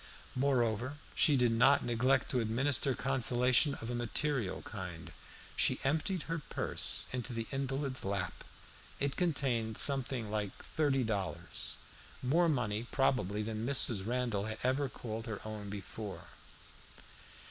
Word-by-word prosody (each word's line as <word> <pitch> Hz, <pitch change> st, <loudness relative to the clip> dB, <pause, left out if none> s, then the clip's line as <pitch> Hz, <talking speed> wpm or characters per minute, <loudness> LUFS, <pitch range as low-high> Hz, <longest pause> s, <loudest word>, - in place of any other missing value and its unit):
Moreover, 125 Hz, 0 st, +1 dB, 0.2 s
she 145 Hz, -3 st, +4 dB
did 120 Hz, -2 st, +3 dB
not 125 Hz, +5 st, +5 dB
neglect 130 Hz, +3 st, +2 dB
to 125 Hz, -, +2 dB
administer 130 Hz, +4 st, +1 dB
consolation 130 Hz, +1 st, +3 dB
of 115 Hz, +2 st, -6 dB
a -, -, -2 dB
material 120 Hz, -2 st, -1 dB
kind. 95 Hz, -6 st, -7 dB, 0.4 s
She -, -, +3 dB
emptied 160 Hz, +5 st, 0 dB
her 165 Hz, 0 st, -3 dB
purse 150 Hz, -, 0 dB
into 125 Hz, -1 st, -3 dB
the 115 Hz, -1 st, -2 dB
invalid's 135 Hz, -1 st, -2 dB
lap. 95 Hz, -3 st, -2 dB, 0.6 s
It 140 Hz, 0 st, 0 dB
contained 130 Hz, -10 st, 0 dB
something 130 Hz, -5 st, +2 dB
like 105 Hz, -2 st, -2 dB
thirty 140 Hz, -4 st, +1 dB
dollars 95 Hz, -6 st, -3 dB, 0.5 s
more 165 Hz, +7 st, +3 dB
money, 120 Hz, -5 st, -1 dB
probably, 115 Hz, -7 st, +1 dB
than 110 Hz, 0 st, -3 dB
Mrs. 120 Hz, -5 st, +2 dB
Randall 120 Hz, -3 st, 0 dB
had 110 Hz, 0 st, -4 dB
ever 130 Hz, +2 st, +1 dB
called 110 Hz, -1 st, -6 dB
her 110 Hz, -3 st, -4 dB
own 105 Hz, -2 st, -6 dB
before. 100 Hz, 0 st, -7 dB
120 Hz, 130 wpm, -33 LUFS, 110-135 Hz, 0.6 s, not